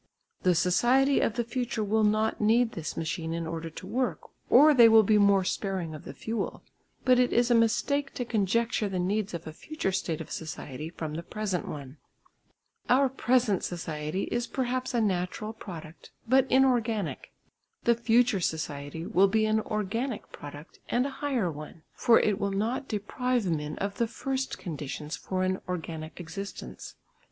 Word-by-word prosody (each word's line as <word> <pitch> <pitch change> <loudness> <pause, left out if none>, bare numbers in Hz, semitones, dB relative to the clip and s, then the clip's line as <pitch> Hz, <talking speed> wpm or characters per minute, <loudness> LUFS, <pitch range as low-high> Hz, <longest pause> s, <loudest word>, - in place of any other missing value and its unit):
The 180 -1 +3
society 245 - +3
of 220 - +1
the 240 - 0
future 235 -2 -2
will 215 +2 +2
not 215 +1 +1
need 225 +2 +4
this 165 -7 -5
machine 160 0 -2
in 170 0 -3
order 165 0 -4
to 160 - -10
work 255 0 -2 0.2
or 305 +1 +8
they 235 -4 +8
will 220 0 +7
be 210 +1 +4
more 200 -1 +5
sparing 185 -4 -2
of 155 - -9
the - - -7
fuel. 225 -2 -4 0.4
But 255 -1 +5
it 250 - +3
is 240 +1 +3
a - - +7
mistake 275 +5 +1
to 245 - -2
conjecture 225 0 +1
the 190 - -3
needs 195 +2 -1
of 170 - -7
a 155 - -7
future 300 - -3
state 170 -4 -2
of - - -8
society 155 -1 -6
from 160 -2 -5
the 165 - -3
present 195 0 -3
one. 140 -1 -7 0.9
Our 265 +2 +5
present 245 -5 +1
society 160 0 -3
is 240 +1 -1
perhaps 255 -1 -2
a 235 - +3
natural 200 +2 -1
product, 170 -7 -10 0.2
but 260 +2 +4
inorganic; 240 -7 +1 0.5
the 235 - +5
future 235 -2 +3
society 155 -1 -3
will 190 +3 +4
be 215 +2 +2
an 215 0 +2
organic 215 +4 -3
product 145 +2 -10
and 245 +2 +2
a 280 - -3
higher 255 - 0
one, 155 +2 -10
for 230 - +5
it 210 -2 +1
will 200 - 0
not 225 +7 -1
deprive 245 +3 -1
men 150 -3 -2
of 200 0 -3
the 235 - +2
first 265 +3 -3
conditions 150 -2 -5
for 185 -1 -2
an 185 0 0
organic 160 -3 -5
existence. 180 +4 -7
210 Hz, 170 wpm, -28 LUFS, 170-240 Hz, 0.9 s, or